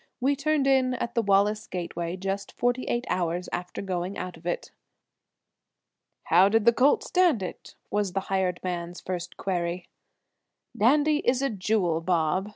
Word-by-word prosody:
We 275 +2 +2
turned 290 0 +1
in 260 -2 +3
at 240 -1 -4
the 230 - +2
Wallace 205 +1 +2
gateway 175 0 -4
just 195 +1 -4
forty 245 +1 0
eight 240 +1 -1
hours 175 0 -1
after 180 +2 -4
going 185 0 -3
out 180 -1 -5
of 165 +1 -11
it. 175 - -3 1.5
"How 180 +4 +5
did 225 +1 +2
the 235 - +6
colt 265 +5 +3
stand 350 - +2
it?" 185 - -8 0.2
was 205 -3 0
the 195 - 0
hired 190 -2 -1
man's 175 -1 -4
first 175 -1 -5
query. 175 -1 -2 0.9
"Dandy 295 +6 +4
is 255 0 +1
a 275 - +1
jewel, 185 -5 0
Bob!" 175 +3 0
195 Hz, 160 wpm, -27 LUFS, 175-240 Hz, 1.5 s, the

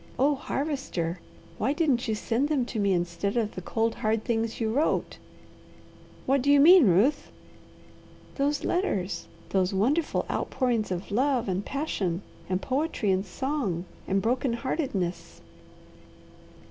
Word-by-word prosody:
Oh 285 +3 +3
Harvester! 265 - -3 0.4
why 275 - +1
didn't 285 -7 +1
you 220 - 0
send 240 +6 0
them 280 -5 +1
to 235 -2 -4
me 200 -1 +2
instead 175 +4 -1
of 220 -2 0
the 185 - -6
cold, 225 +4 0
hard 220 0 -1
things 225 -2 -1
you 220 -1 0
wrote?" 295 +5 0 1.1
"What 270 0 +2
do 285 +3 +3
you 285 - +6
mean, 335 - +8
Ruth?" 205 - +2 1.0
"Those 285 +1 0
letters! 205 - -1 0.2
Those 190 0 +1
wonderful 275 - +1
outpourings 240 -5 -1
of 185 +2 -4
love 255 +1 +1
and 190 +1 -1
passion 205 - -2 0.3
and 185 0 +1
poetry 260 -4 -1
and 190 0 +1
song 210 - -2 0.2
and 195 0 +1
broken 245 +2 +1
heartedness. 235 - -3
230 Hz, 135 wpm, -27 LUFS, 195-280 Hz, 1.1 s, mean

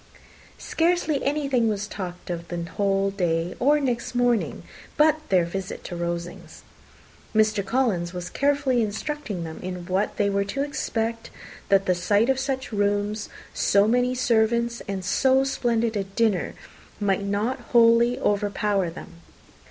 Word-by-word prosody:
Scarcely 330 -4 0
anything 275 -5 +1
was 205 -1 -2
talked 180 -3 -6
of 170 0 -5
the 175 0 -4
whole 195 +3 0
day 175 -3 -1
or 290 +4 +4
next 245 -3 -2
morning 245 -2 +1 0.3
but 310 0 +4
their 180 -3 +4
visit 190 +2 -5
to 175 - -6
Rosings. 170 0 -5 0.7
Mr. 215 -1 +3
Collins 195 -6 0
was 180 -1 -5
carefully 280 -3 +1
instructing 220 - -3
them 160 -1 -7
in 180 -1 -5
what 190 +3 -1
they 205 - +2
were 200 0 +1
to 270 +8 -2
expect, 230 -6 -3 0.4
that 195 0 +4
the 185 - +3
sight 205 +7 +2
of 265 - -1
such 265 -2 -3
rooms, 205 0 -1 0.2
so 200 +1 +3
many 250 +2 +2
servants, 235 -1 +1
and 195 -2 -4
so 265 +7 +3
splendid 235 -4 0
a 200 - 0
dinner, 195 -1 0 0.4
might 200 -2 +1
not 205 +5 -1
wholly 235 +1 +4
overpower 205 -2 0
them. 170 0 -11
210 Hz, 145 wpm, -24 LUFS, 190-245 Hz, 0.7 s, or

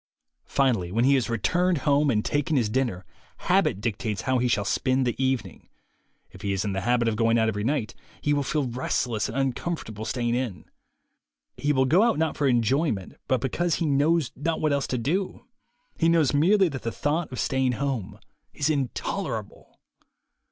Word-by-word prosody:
Finally, 115 -11 +1
when 115 +4 +1
he 140 - +5
has 130 -4 +1
returned 175 +10 +1
home 145 0 +3
and 105 -4 +1
taken 145 +1 0
his 115 -5 +1
dinner, 110 -7 -1 0.3
habit - - +1
dictates 110 -1 -3
how 130 -1 +1
he 125 - +1
shall 105 -4 +1
spend 130 +3 +1
the 120 - +1
evening. 130 -9 -2 0.6
If 95 - -13
he 100 -2 -1
is 95 +2 -1
in 100 - -1
the 95 - -2
habit 120 -1 +1
of 110 - +1
going 115 +1 +2
out 110 -1 +3
every 105 -1 -3
night, 115 -6 -1 0.3
he 145 - +1
will 145 - +1
feel 145 +2 -1
restless 120 -2 -1
and 115 - -5
uncomfortable 135 -4 -3
staying 120 0 -1
in. 120 -6 -3 0.9
He 145 - 0
will 130 -2 +3
go 165 +9 +4
out 230 0 +3
not 160 0 0
for 145 - +1
enjoyment, 120 - +1
but 130 -2 +1
because 170 +6 0
he 165 - -1
knows 150 -1 +2
not 160 +3 -2
what 155 -2 +1
else 140 -1 0
to 125 - -1
do. 180 - -2 0.5
He 165 - +4
knows 160 -5 +3
merely 190 +7 +4
that 135 -4 -6
the 115 - -3
thought 155 +5 -1
of 125 - -5
staying 130 -1 +1
home 130 -5 -3 0.4
is 145 +2 +1
intolerable. 140 -4 -4
130 Hz, 185 wpm, -26 LUFS, 115-145 Hz, 0.9 s, he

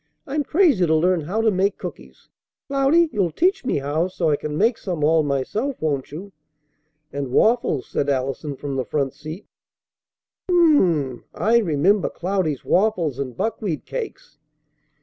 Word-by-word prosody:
"I'm 295 +2 -1
crazy 300 - +3
to 160 - +3
learn 175 +2 +2
how 190 +9 -2
to 225 -1 +3
make 195 +1 +1
cookies. - - -10 0.4
Cloudy, 280 +5 +3
you'll 195 -5 +1
teach 375 - +1
me 255 - 0
how 145 +5 -1
so 170 -4 -1
I - - +3
can 150 +1 -5
make 225 +5 +2
some 175 -6 -3
all 160 +1 +4
myself, 155 - -2
won't 145 -4 -2
you?" 185 +7 -8 0.8
"And 140 -2 -3
waffles!" 220 - +2
said 145 - -2
Allison 135 +2 -2
from 140 0 -5
the 130 - 0
front 135 0 -2
seat. 155 +8 -9 1.0
"Um 355 - +3
mmm 320 -4 +6
mmmm! 140 -8 0
I 230 +2 +3
remember 185 +1 +2
Cloudy's 180 -6 -2
waffles. 180 - +1
And 130 -4 -5
buckwheat 205 - -2
cakes." - - -7
170 Hz, 160 wpm, -22 LUFS, 145-220 Hz, 1.0 s, mmm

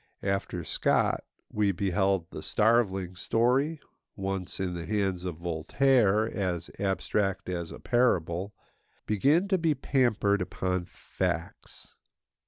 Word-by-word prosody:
After 95 -3 -2
Scott - - +1 0.3
we 105 -1 +2
beheld 95 -1 0
the - - -7
starveling 95 -5 +1
story—once, 115 - -1
in 95 -2 -1
the 85 -1 -5
hands 95 -4 -1
of 90 -3 -3
Voltaire, 105 - +2
as 95 -6 -3
abstract 95 0 -1
as 85 -2 -3
a - - -8
parable—begin 105 - 0
to 190 -2 +2
be 160 -2 +2
pampered 110 -7 +1
upon 90 0 -2
facts. - - -5
95 Hz, 105 wpm, -28 LUFS, 90-115 Hz, 0.3 s, we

